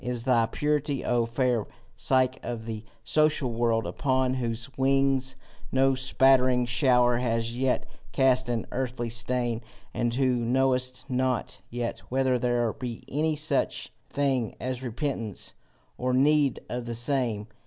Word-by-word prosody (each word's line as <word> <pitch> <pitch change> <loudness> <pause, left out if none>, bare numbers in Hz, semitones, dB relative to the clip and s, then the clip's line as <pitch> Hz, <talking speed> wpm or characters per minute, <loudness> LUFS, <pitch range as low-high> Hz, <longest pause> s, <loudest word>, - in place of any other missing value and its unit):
Is 125 -1 -3
thy 120 -3 +3
purity, 150 0 -1
O 120 -1 +1
fair 120 -2 0 0.3
Psyche 130 -1 +1
of 115 -2 -5
the 110 -1 -5 0.2
social 155 -1 +2
world, 115 -1 +1
upon 130 -1 0
whose 115 -3 -3
wings 135 0 +2 0.4
no 135 +1 +3
spattering 130 -1 +3
shower 120 0 +3
has 115 -1 -1
yet 130 +1 0 0.3
cast 130 -2 +3
an 115 -2 -1
earthy 125 -2 -2
stain, 120 0 0 0.3
and 120 -1 0
who 130 -1 +2
knowest 130 +2 +1
not 130 -2 -1
yet 120 0 -3
whether 130 -1 +1
there 120 -2 +1
be 125 -4 -6
any 155 +2 0
such 155 +1 -1 0.2
thing 135 -5 0
as 130 +1 -3
repentance 120 - -4 0.5
or 125 0 0
need 145 0 +3
of 120 -1 -4
the 120 - -3
same! 120 -4 0
125 Hz, 135 wpm, -27 LUFS, 120-130 Hz, 0.5 s, thy